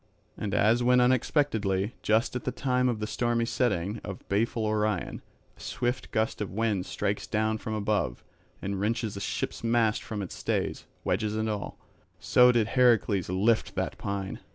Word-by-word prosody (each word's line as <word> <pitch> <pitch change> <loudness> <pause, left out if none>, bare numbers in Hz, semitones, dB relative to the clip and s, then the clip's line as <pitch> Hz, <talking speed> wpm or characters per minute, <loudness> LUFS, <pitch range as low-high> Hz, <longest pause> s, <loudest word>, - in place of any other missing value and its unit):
And 105 -1 -3
as 110 +4 +4
when 125 +1 +4
unexpectedly, 115 -5 +1
just 110 +4 +1
at 125 - -3
the 130 - -1
time 125 -1 +1
of 115 -3 -2
the 105 - -2
stormy 120 +1 0
setting 105 -4 0
of 100 -2 -8
baleful 110 +2 +1
Orion, 105 -2 -1 0.3
a - - -25
swift 125 +1 -2
gust 110 0 -1
of 105 - -2
wind 105 -2 -1
strikes - - -2
down 110 0 0
from 110 0 -4
above, 100 - -1 0.4
and 100 0 -2
wrenches 110 0 -1
a - - -5
ship's - - -3
mast 115 -2 +2
from 105 -3 -4
its 90 - -7
stays, - - -2 0.2
wedges 105 -1 0
and 110 0 -1
all; 105 -2 -4 0.4
so 125 0 +5
did 115 -3 +1
Heracles 115 -7 +3
lift 105 +5 +1
the - - -1
pine. 100 -1 -4
110 Hz, 170 wpm, -28 LUFS, 100-120 Hz, 0.4 s, so